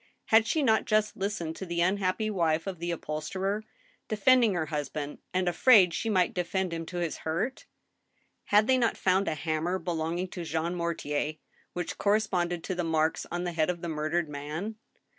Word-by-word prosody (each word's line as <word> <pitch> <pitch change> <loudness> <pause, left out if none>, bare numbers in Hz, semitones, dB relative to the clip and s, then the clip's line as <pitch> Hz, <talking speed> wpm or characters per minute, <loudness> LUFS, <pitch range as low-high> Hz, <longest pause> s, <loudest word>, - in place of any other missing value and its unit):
Had 220 0 +5
she 310 +3 +1
not 220 -4 +3
just 215 -1 +1
listened 190 -5 -3
to 190 - -5
the 170 0 -1
unhappy 195 +3 +1
wife 165 -4 +1
of 190 -4 -5
the 170 +1 -3
upholsterer, 185 +6 -2 0.4
defending 225 0 +4
her 160 -2 0
husband, 150 -1 -4
and 185 0 0
afraid 180 0 +6
she 225 - -2
might 185 -4 +2
defend 180 0 -1
him 165 -1 -4
to 180 - -6
his 170 -2 -2
hurt? 170 +12 -3 0.8
Had 210 +1 +4
they 260 +2 +3
not 235 -2 +1
found 190 +1 +2
a 155 - 0
hammer 160 +4 -1
belonging 175 +1 -2
to 175 - -6
Jean 165 +2 -2
Mortier, 155 -3 -2 0.4
which 175 -1 -4
corresponded 180 -5 +1
to 185 - -2
the 175 -1 -2
marks 160 -1 0
on 175 0 -2
the 175 - -2
head 160 0 +1
of 175 -1 -2
the 170 - -4
murdered 155 +2 -1
man 150 +9 -5
175 Hz, 180 wpm, -29 LUFS, 160-200 Hz, 0.8 s, afraid